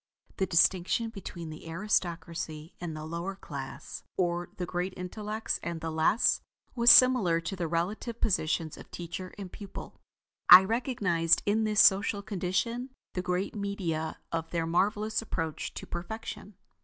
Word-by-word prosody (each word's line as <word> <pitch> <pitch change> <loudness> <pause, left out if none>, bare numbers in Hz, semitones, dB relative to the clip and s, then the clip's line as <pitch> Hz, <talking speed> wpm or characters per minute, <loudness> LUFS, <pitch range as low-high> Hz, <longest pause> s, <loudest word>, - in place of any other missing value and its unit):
The 190 - +1
distinction 185 +6 +2
between 175 -6 -7
the 155 +1 -10
aristocracy 170 -3 -2
and 165 -3 -4
the 155 - -6
lower 170 +4 -4
class, 140 -5 -7 0.2
or 175 -1 0
the 180 - -2
great 180 +2 -3
intellects 210 +4 -3
and 170 -1 -4
the 165 0 -4
less, 160 +8 +3 0.3
was 235 -1 +5
similar 240 -11 +7
to 170 +4 -4
the 175 -3 -2
relative 200 +8 -2
positions 160 -5 0
of - - -12
teacher 180 +2 -6
and 195 -3 -7
pupil. 200 -2 -9 0.5
I 180 +1 +12
recognized 200 -7 +1
in 220 +2 +2
this 215 -1 +4
social 200 +1 +4
condition 210 +6 -2 0.2
the 180 - -2
great 180 +2 -2
media 190 -6 -3
of 165 0 -2
their 165 -1 -1
marvelous 210 +6 +1
approach 165 -8 -4
to - - -6
perfection. 205 +2 -6
180 Hz, 145 wpm, -29 LUFS, 165-210 Hz, 0.5 s, I